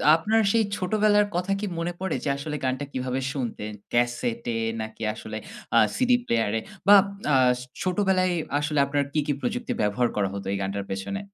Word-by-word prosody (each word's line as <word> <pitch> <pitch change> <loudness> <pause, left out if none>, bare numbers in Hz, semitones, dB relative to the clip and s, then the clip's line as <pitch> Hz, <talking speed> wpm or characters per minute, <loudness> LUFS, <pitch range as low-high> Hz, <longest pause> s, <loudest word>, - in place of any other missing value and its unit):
আপনার 215 +7 +2
সেই 230 0 +3
ছোটবেলার 210 +2 +3
কথা 180 +2 -1
কি 210 - -2
মনে 170 +1 -2
পড়ে 190 -3 -1
যে - - -1
আসলে 150 +2 -4
গানটা 130 +2 -1
কিভাবে 130 0 -2
শুনতেন? 115 -5 -4 0.2
ক্যাসেটে 120 -1 0 0.3
নাকি 110 0 -7
আসলে 110 0 -7 0.4
আ - - +7 0.2
সিডি 255 -1 +4
প্লেয়ার-এ 115 - +1 0.3
বা 205 - +10 0.4
আ - - +6 0.5
ছোটবেলায় 185 -1 +2 0.3
আসলে 150 0 0
আপনার 140 0 0
কী, 155 - +2
কী 145 - +2
প্রযুক্তি 245 0 -2
ব্যবহার 105 +4 +2
করা 100 -2 +1
হত 100 0 -5
এই 100 - 0
গানটার 100 +1 -3
পেছনে? 95 - -3
140 Hz, 170 wpm, -25 LUFS, 115-190 Hz, 0.5 s, বা